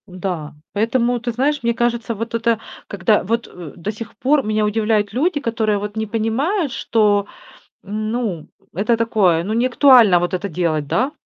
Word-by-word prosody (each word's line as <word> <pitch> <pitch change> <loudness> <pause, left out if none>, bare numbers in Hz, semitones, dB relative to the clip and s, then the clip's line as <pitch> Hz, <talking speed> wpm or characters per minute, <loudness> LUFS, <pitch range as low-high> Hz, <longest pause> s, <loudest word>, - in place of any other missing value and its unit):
М-да. 180 -4 -5 0.2
Поэтому, 235 +3 +1
ты 240 +1 -3
знаешь, 280 +5 0
мне 235 0 +2
кажется, 235 0 -1
вот 230 +3 -5
это 230 -1 +1 0.3
когда 200 +2 +1
вот, 230 +5 -1
э, 170 -5 -10
до 180 +4 -4
сих 220 +1 -9
пор 280 +1 +2
меня 215 -1 0
удивляют 210 -1 0
люди, 295 +5 +1
которые 225 -5 0
вот 205 +1 -5
не 220 - -1
понимают, 255 - -1
что 210 -5 +1 0.6
Ну, 215 -4 -3 0.3
это 215 +6 +1
такое, 205 -8 +2
ну, 210 +4 -3
неактуально 245 -5 +5
вот 175 +1 -2
это 185 +2 -2
делать, 155 -3 -1
да. 255 - 0
220 Hz, 165 wpm, -19 LUFS, 200-235 Hz, 0.6 s, неактуально